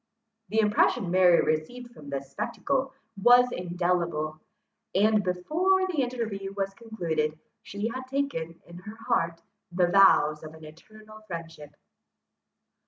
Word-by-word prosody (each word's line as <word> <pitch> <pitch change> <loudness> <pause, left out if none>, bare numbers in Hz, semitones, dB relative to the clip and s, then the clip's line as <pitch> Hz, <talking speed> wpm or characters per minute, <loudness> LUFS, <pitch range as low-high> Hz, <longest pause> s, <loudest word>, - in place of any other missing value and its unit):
The 220 +2 +1
impression 210 -2 +2
Mary 180 -2 +5
received 240 +11 -3
from 150 -10 -12
this 135 -1 -5
spectacle 270 -1 -2 0.3
was 245 +2 +6
indelible; 175 -4 -2 0.6
and, 210 +1 +3
before 330 - +1
the 345 -7 -1
interview 220 -6 -4
was 195 0 -2
concluded, 170 -9 -3 0.2
she 205 +2 -4
had 255 +2 -6
taken, 260 - -3
in 170 0 -12
her 210 +4 -10
heart, 170 -8 0 0.3
the 180 0 +2
vows 165 -6 +5
of 155 0 -10
an 160 -1 -13
eternal 215 +7 -15
friendship. 165 -4 -8
195 Hz, 125 wpm, -27 LUFS, 165-235 Hz, 0.6 s, was